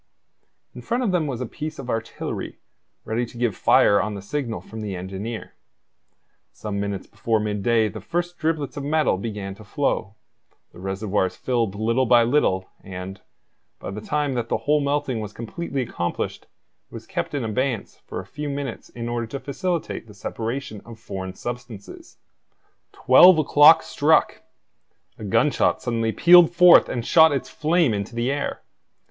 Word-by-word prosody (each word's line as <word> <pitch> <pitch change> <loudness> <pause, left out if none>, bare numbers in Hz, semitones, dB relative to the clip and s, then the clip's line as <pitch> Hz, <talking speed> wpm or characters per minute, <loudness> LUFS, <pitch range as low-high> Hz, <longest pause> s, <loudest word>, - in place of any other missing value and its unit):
In - - -9
front 240 +2 -1
of 215 - +1
them 170 -4 0
was 130 -3 -4
a - - -2
piece 155 +6 -6
of 135 - -8
artillery 115 -2 -4 0.5
ready 115 +2 -1
to 120 0 -9
give 120 -5 0
fire 100 - +4
on 105 -1 -3
the 100 - -7
signal 120 0 -3
from 110 0 -9
the 100 -3 -4
engineer. 95 +5 -6 1.0
Some 100 +3 -5
minutes 100 -1 -3
before 115 -1 -1
midday 105 +2 +1
the 110 0 -7
first 175 - -3
driblets 155 -3 -1
of 140 - -4
metal 150 -7 +1
began 105 -2 -5
to 100 - -14
flow; 105 -3 -2 0.6
the - - -15
reservoirs 95 0 -1
filled 115 -6 -1
little 115 +4 +1
by 120 0 +6
little; 115 -7 +1 0.2
and, 95 0 -8 0.6
by - - -7
the 105 +2 -6
time 145 +4 -1
that 120 -2 -3
the - - +1
whole 150 +1 +3
melting 140 -4 -1
was 105 -1 -6
completely 135 +4 -4
accomplished, 85 -7 -4
it - - -40 0.5
was - - -9
kept - - -4
in 140 - -2
abeyance 115 +1 -2
for - - -5
a - - -8
few 150 0 -6
minutes 140 -7 -5
in 120 -1 -6
order 120 -1 -2
to 135 +5 -6
facilitate 165 - -3
the 105 - -14
separation 115 +1 -5
of 115 -1 -12
foreign 95 -4 -7
substances. 120 -3 -8 0.7
Twelve 175 +7 +7
o'clock 155 +1 +6
struck! 155 +2 +2 0.8
A - - -8
gunshot 120 +9 +2
suddenly 115 -2 -1
pealed 175 +5 +7
forth 180 0 +7
and 120 -2 -3
shot 160 -1 +6
its 140 -2 -2
flame 160 -4 +1
into 100 +3 -4
the 120 +3 0
air. 145 0 -3
120 Hz, 165 wpm, -23 LUFS, 105-145 Hz, 1.0 s, Twelve